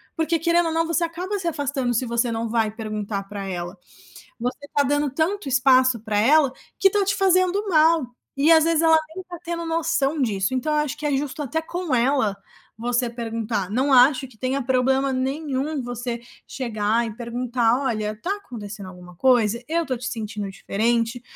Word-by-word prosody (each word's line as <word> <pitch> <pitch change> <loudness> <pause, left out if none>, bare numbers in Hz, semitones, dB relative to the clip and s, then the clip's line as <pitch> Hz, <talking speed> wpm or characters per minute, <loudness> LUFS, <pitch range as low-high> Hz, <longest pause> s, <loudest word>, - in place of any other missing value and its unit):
porque, 325 +1 0
querendo 340 +1 +2
ou - - -1
não, 330 0 +1
você 335 +1 +1
acaba 355 +5 -3
se 350 - -4
afastando 280 -5 -1
se 240 +3 0
você 235 0 0
não 225 0 -2
vai 225 -1 +1
perguntar 215 -2 -4
pra 200 0 -6
ela. 175 +1 -5 0.6
Você 250 +4 -4
tá 285 - +4
dando 290 +1 +1
tanto 325 +4 -1
espaço 255 -1 +4
para 215 -2 -2
ela, 275 +4 +4 0.3
que 390 - +6
tá 410 0 +2
te 395 +1 +1
fazendo 380 +1 +2
mal 320 -3 +4 0.3
e, 295 +4 +4
às 320 -1 +7
vezes, 330 -1 +2
ela 320 -1 +6 0.2
nem 375 - -6
tá 350 -1 -8
tendo 335 0 -4
noção 325 -3 0
disso. 200 -3 0
Então, 260 +4 -1
eu 300 - +2
acho 290 -2 -4
que 305 - -6
é 285 - +1
justo 290 +2 -4
até 295 +3 -2
com 345 -4 -2
ela 235 -5 +1 0.4
você 240 +1 0
perguntar. 225 -4 -3
Não 260 +6 +1
acho 260 +2 +5
que 240 -3 -20
tenha 260 +4 -1
problema 265 +2 +2
nenhum 275 +2 -2
você 240 0 -4 0.3
chegar 230 -2 -1
e 220 - -6
perguntar: 240 +1 0
"Olha, 215 -5 -1
está 355 - -3
acontecendo 210 - -9
alguma 180 -1 -12
coisa? 235 -3 +3
Eu 335 +2 +1
estou 265 -5 -3
te 245 +2 -5
sentindo 215 -3 -5
diferente, 230 +5 -1
255 Hz, 190 wpm, -23 LUFS, 230-315 Hz, 0.6 s, às